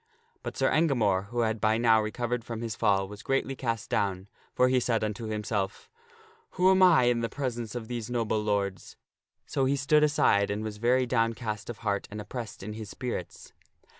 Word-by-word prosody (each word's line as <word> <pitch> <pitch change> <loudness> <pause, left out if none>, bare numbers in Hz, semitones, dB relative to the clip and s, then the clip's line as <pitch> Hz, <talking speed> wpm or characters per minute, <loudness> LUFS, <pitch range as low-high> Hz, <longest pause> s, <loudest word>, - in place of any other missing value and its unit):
But - - -6
Sir - - +2
Engamore, 110 - +2
who 120 +2 -1
had 110 -2 0
by 110 +1 +3
now 115 -1 +4
recovered 120 +2 -2
from 115 -1 -6
his 115 -3 -3
fall, 95 -1 +2
was 105 +1 -10
greatly 135 +2 -1
cast 115 -4 -3
down, 100 -1 -1 0.3
for 125 - +4
he 130 0 +3
said 115 -3 0
unto 110 +2 -3
himself, 105 -2 -3 0.3
" 450 0 -30
Who 185 +1 +5
am 190 0 +4
I 175 -8 +7
in 120 -1 +3
the 115 0 -2
presence 120 -4 -4
of 115 -2 -5
these 120 -2 -4
noble 115 -3 0
lords?" 100 -3 -2 0.5
So 135 - 0
he 135 +2 +2
stood 145 +2 +3
aside 120 -9 +3
and 105 +1 -2
was 110 -1 -5
very 125 +3 +2
downcast 115 -3 -1
of 120 - -5
heart 100 -1 0
and 105 - -7
oppressed 110 -1 -7
in 105 +2 -5
his 110 -1 -7
spirits. 120 -6 -6
115 Hz, 195 wpm, -28 LUFS, 105-125 Hz, 0.5 s, I